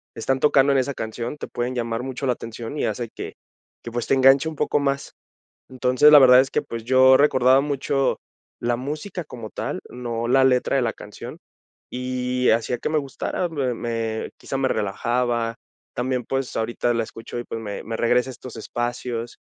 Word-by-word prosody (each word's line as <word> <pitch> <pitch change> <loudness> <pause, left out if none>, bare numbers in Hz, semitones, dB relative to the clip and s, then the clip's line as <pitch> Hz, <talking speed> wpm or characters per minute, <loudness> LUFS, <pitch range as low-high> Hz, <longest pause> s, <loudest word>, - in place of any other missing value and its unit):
están 130 +4 -1
tocando 140 -1 +4
en - - +3
esa 140 +2 -1
canción, 115 +5 -5
te - - -6
pueden 120 +1 -3
llamar 115 0 -2
mucho 130 +1 -4
la 125 - +3
atención, 115 +4 -7
y - - -1
hace 120 -2 -2
que - - -7 0.5
que, 120 - -7
pues, 120 0 -2
te - - +2
enganche 135 +3 +5
un 160 - -8
poco 145 - +1
más. 140 0 -2 0.6
Entonces, 130 +3 +4
la 150 - +10
verdad 130 -1 +8
es 135 - -4
que, - - +1
pues, 115 -1 -7
yo 130 +2 +6
recordaba 130 -2 +4
mucho 140 -1 0 0.4
la 120 0 0
música 155 +8 -5
como 115 -6 -9
tal, - - -4
no 120 -1 -4
la 130 +2 +4
letra 130 +1 +2
de 135 - +3
la 115 - 0
canción, 105 - -10 0.5
y 125 0 -1
hacía 115 +2 +1
que - - -3
me 155 - +1
gustara, 140 +5 -3
me 135 -6 -1
me 115 -1 -3
quizá, 135 - -4
me 135 -1 +1
relajaba, 120 +2 -1 0.4
también, 125 -1 -1
pues, 135 -1 -2
ahorita 120 +1 0
la 115 - 0
escucho 115 +2 -8
y, 120 - -6
pues, 115 - -5
me 105 -2 -6
me 115 +1 -4
regresa 125 +2 +2
a - - -4
estos 125 +1 -10
espacios. 120 0 -4
125 Hz, 195 wpm, -23 LUFS, 115-135 Hz, 0.6 s, la